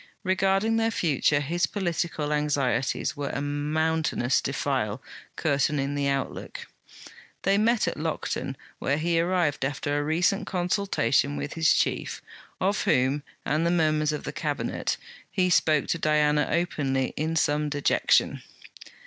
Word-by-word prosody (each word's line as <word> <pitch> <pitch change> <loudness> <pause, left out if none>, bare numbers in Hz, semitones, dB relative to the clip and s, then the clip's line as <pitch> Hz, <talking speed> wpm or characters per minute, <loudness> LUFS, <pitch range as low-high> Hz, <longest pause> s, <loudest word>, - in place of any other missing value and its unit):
Regarding 195 +3 +2
their 225 0 +2
future, 150 - +1
his 170 +5 0
political 170 -5 -2
anxieties 140 -4 0
were 145 -1 -3
a - - -3
mountainous 150 -2 0
defile, 130 -5 -1 0.4
curtaining 140 -2 0
the 140 -1 0
outlook. 140 -1 -3 0.8
They 195 +1 +3
met 225 -2 +2
at 170 - -2
Lockton, 155 -3 -3 0.2
where 140 - 0
he 165 +1 +1
arrived 170 -5 +1
after 145 +1 -2
a - - -1
recent 180 +7 +1
consultation 175 - +1
with 140 +1 -4
his 160 -1 +3
Chief, - - 0 0.4
of 195 +2 0
whom, 130 +3 +2 0.2
and 155 +3 +1
the 170 - +2
murmurs 155 -3 +2
of 150 - -4
the - - -5
Cabinet, - - -2 0.3
he 180 -2 +1
spoke 155 -3 +3
to 165 - 0
Diana 150 -1 +2
openly, 135 -7 0
in 160 +2 -1
some 150 -1 +1
dejection. 145 -1 +2
150 Hz, 135 wpm, -26 LUFS, 145-175 Hz, 0.8 s, They